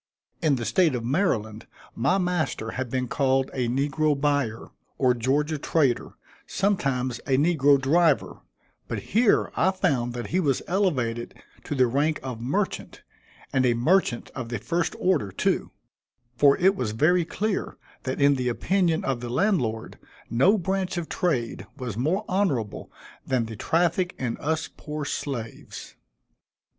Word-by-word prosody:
In 155 -4 +3
the 120 -3 -4
State 170 -4 +3
of 115 -2 -3
Maryland, 115 - -1 0.3
my 140 +11 +1
master 175 -11 -1
had 130 -1 -4
been 125 0 -1
called 135 +1 +1
a 125 -2 -1
negro 145 +3 +1
buyer, 140 -6 0 0.3
or 130 -2 +3
Georgia 145 +6 0
trader, 140 -6 +1 0.3
sometimes 135 - 0
a 135 -2 +3
negro 145 -2 +4
driver; 150 0 +2 0.5
but - - -3 0.2
here, 225 0 +3
I 185 - +3
found 140 -11 0
that 120 - -5
he 185 - +3
was 140 -7 +1
elevated 130 - -1 0.3
to 145 - -3
the 130 -2 +4
rank 145 +6 +1
of 125 -4 -5
merchant, 170 - -2 0.5
and 130 - +3
a 120 -2 +3
merchant 135 0 +1
of 125 -3 -6
the 120 - -2
first 170 +4 -1
order 155 - +1
too; - - 0 0.7
for 140 +2 +5
it 190 +3 +4
was 110 - -2
very 170 +9 +3
clear 205 +5 -3 0.2
that 130 0 -4
in 140 0 +4
the 125 -1 0
opinion 170 +5 +1
of 130 -3 -1
the 120 0 -6
landlord, 125 - 0 0.3
no 180 - +4
branch 190 0 -2
of 170 -2 -4
trade 140 -11 -1
was 125 -6 -5
more 160 - 0
honorable 140 - -1 0.3
than 125 -3 0
the 110 0 -7
traffic 175 - 0
in 125 -3 -2
us 160 +1 -1
poor 150 -1 -6
slaves. 120 -6 -6
140 Hz, 150 wpm, -25 LUFS, 125-175 Hz, 0.7 s, for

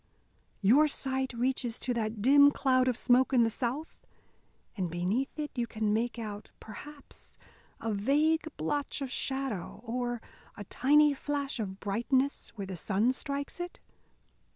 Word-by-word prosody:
Your 270 +10 +6
sight 265 -2 -1
reaches 245 -1 -1
to 250 - -1
that 215 -2 -2
dim 285 +3 +7
cloud 260 -2 +2
of 250 -3 +1
smoke 255 +2 +3
in 245 -2 +6
the 225 - +1
south? 260 +7 -4 0.7
And 185 -5 -2
beneath 185 - -1
it 300 -1 -3
you 240 -2 -2
can 215 -2 -1
make 230 +2 -1
out, 210 -2 -6
perhaps, 285 +7 -11 0.4
a 225 -1 -2
vague 290 +10 +2 0.2
blotch 280 - -2
of 265 - -5
shadow, 265 -9 -3
or 240 0 -2 0.4
a 205 - -6
tiny 295 +8 +4
flash 280 -1 -3
of 195 -3 -4
brightness 255 +7 0
where 200 -3 -5
the 190 -1 -6
sun 210 +7 +1
strikes 280 +3 -4
it? 350 0 -6
250 Hz, 150 wpm, -30 LUFS, 220-280 Hz, 0.7 s, dim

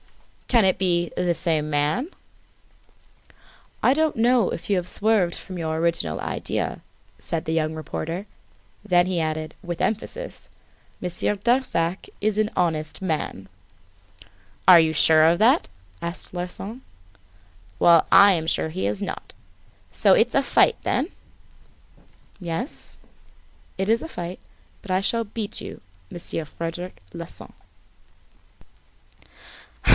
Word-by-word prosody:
"Can 230 -5 +4
it 190 - +2
be 175 -2 +1
the 175 -1 +1
same 155 -2 0
man?" 150 - 0 1.7
"I 255 - +5
don't 315 -1 +1
know 235 -2 +3
if - - -6
you 200 - +3
have 180 0 -2
swerved 205 -5 +1
from 185 -2 -7
your 160 -1 -2
original 165 - 0
idea," - - -3 0.4
said 165 -1 -3
the 160 - -1
young 160 -1 0
reporter. 165 +4 -5 0.6
Then 175 -4 +3
he 180 -2 -1
added, 155 0 -3
with 175 -2 -5
emphasis: 455 - -3 0.5
"Monsieur 180 +3 -1
Darzac 200 -6 0
is 210 0 0
an 215 0 +2
honest 160 -2 -1
man!" 155 - -3 1.2
"Are 180 -2 +10
you 160 -1 +3
sure 160 0 +5
of 165 +2 +4
that?" 225 - +4 0.3
asked 170 +2 -4
Larsan. 190 +7 -4 1.0
"Well, 170 -2 +6
I 200 0 +8
am 160 -2 -2
sure 160 - +1
he 165 - -2
is 105 0 -1
not. - - -5 0.6
So - - +4
it's - - +2
a - - +4
fight - - +4
then?" - - 0 1.3
"Yes, 175 - -4 0.8
it 190 +1 -1
is 225 +2 +3
a 325 - -7
fight. 175 - -6 0.4
But 195 - -7
I 185 - +3
shall 230 +4 0
beat 210 -1 -5
you, - - -8 0.3
Monsieur 165 -1 -4
Frederic 165 - -6
Larsan." - - -9
175 Hz, 130 wpm, -24 LUFS, 160-210 Hz, 1.7 s, Are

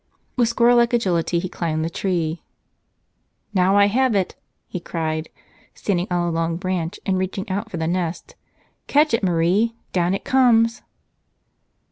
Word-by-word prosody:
With 240 -3 +2
squirrel 240 +1 +4
like 235 +1 +3
agility 180 -7 +1
he 180 +2 -1
climbed 160 -3 -2
the - - -2
tree. 170 -4 -2 1.1
"Now 190 +1 +3
I 200 - +6
have 245 +3 +2
it," 190 -2 0 0.3
he 180 - -5
cried, 160 -2 -3 0.5
standing 185 -2 -1
on 175 -1 0
a - - 0
long 165 0 -1
branch 180 0 -3
and 190 -2 +1
reaching 190 +2 -3
out 200 +4 -3
for 185 - -5
the 160 - -2
nest. 170 0 -3 0.5
"Catch 300 0 +3
it, 230 - +2
Marie! 185 +6 +2 0.2
Down 180 +1 +1
it - - -6
comes 235 -3 +3
185 Hz, 155 wpm, -22 LUFS, 170-225 Hz, 1.1 s, I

